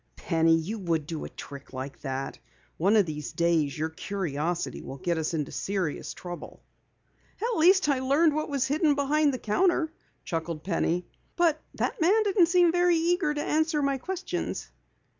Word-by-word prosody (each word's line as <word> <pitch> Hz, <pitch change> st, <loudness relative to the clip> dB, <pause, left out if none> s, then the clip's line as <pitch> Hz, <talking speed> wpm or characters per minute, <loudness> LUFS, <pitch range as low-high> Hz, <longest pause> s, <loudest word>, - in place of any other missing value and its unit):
"Penny, 165 Hz, -1 st, +3 dB
you 200 Hz, +8 st, -4 dB
would 165 Hz, -5 st, -1 dB
do 160 Hz, 0 st, -5 dB
a -, -, -7 dB
trick 140 Hz, -1 st, -10 dB
like 130 Hz, +2 st, -6 dB
that! 135 Hz, -1 st, -4 dB, 0.4 s
One 195 Hz, +6 st, +3 dB
of 210 Hz, -3 st, +5 dB
these 150 Hz, -2 st, -5 dB
days 165 Hz, -5 st, +1 dB
your 160 Hz, +1 st, -1 dB
curiosity 170 Hz, -2 st, -3 dB
will 135 Hz, -, -8 dB
get 170 Hz, +1 st, -1 dB
us 160 Hz, +1 st, -1 dB
into 150 Hz, -3 st, -2 dB
serious 190 Hz, -6 st, -3 dB
trouble." 175 Hz, -1 st, -8 dB, 0.8 s
"At 460 Hz, -3 st, -1 dB
least 370 Hz, +2 st, +5 dB
I 280 Hz, -3 st, +2 dB
learned 285 Hz, +5 st, +3 dB
what 310 Hz, +1 st, -2 dB
was 275 Hz, -2 st, 0 dB
hidden 295 Hz, +2 st, +2 dB
behind 290 Hz, +1 st, +2 dB
the 255 Hz, -, -3 dB
counter," 320 Hz, -, +1 dB, 0.3 s
chuckled 165 Hz, -1 st, -3 dB
Penny. 175 Hz, -1 st, 0 dB, 0.3 s
"But 330 Hz, -3 st, +2 dB
that -, -, -2 dB
Jap 405 Hz, +7 st, +4 dB
didn't 390 Hz, -4 st, +4 dB
seem 350 Hz, -1 st, +4 dB
very 350 Hz, 0 st, +3 dB
eager 335 Hz, -2 st, +1 dB
to 295 Hz, 0 st, -2 dB
answer 315 Hz, -1 st, +1 dB
my 275 Hz, -1 st, +1 dB
questions." 370 Hz, +5 st, -4 dB
220 Hz, 170 wpm, -27 LUFS, -, 0.8 s, of